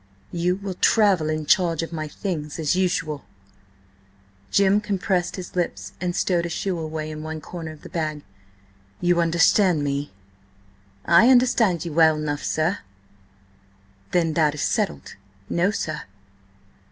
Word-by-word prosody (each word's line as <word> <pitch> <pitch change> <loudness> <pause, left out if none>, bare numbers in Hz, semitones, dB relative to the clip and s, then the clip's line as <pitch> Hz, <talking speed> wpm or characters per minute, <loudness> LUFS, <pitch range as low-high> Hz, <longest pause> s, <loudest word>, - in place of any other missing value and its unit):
"You 175 +1 0
will 195 0 -5
travel 190 -5 +3
in 155 0 -2
charge 170 -1 +2
of 165 - -6
my 155 -1 -3
things, 150 -3 -5
as 160 0 0
usual." 175 -6 -1 1.3
Jim 200 - +3
compressed 190 -3 -1
his 185 -1 -8
lips, 175 -2 -3
and 175 -1 -2
stowed 175 -3 +1
a - - -7
shoe 180 +1 -2
away 155 -1 -4
in 155 0 -7
one 155 0 -5
corner 165 0 -7
of 155 - -14
the - - -8
bag. 155 -4 -3 0.8
"You 175 -1 +2
understand 170 0 +3
me?" 140 0 -2 0.9
"I 170 +8 +6
understand 240 -9 +3
ye 170 - -4
well 160 0 +5
enough, 150 -1 -3
sir." 165 +5 0 1.3
"Then 165 -3 +1
that 150 -2 +2
is 150 - -3
settled." 70 -2 -2 0.3
"No, 175 +3 +2
sir." 155 -7 -3
170 Hz, 140 wpm, -23 LUFS, 155-185 Hz, 1.3 s, I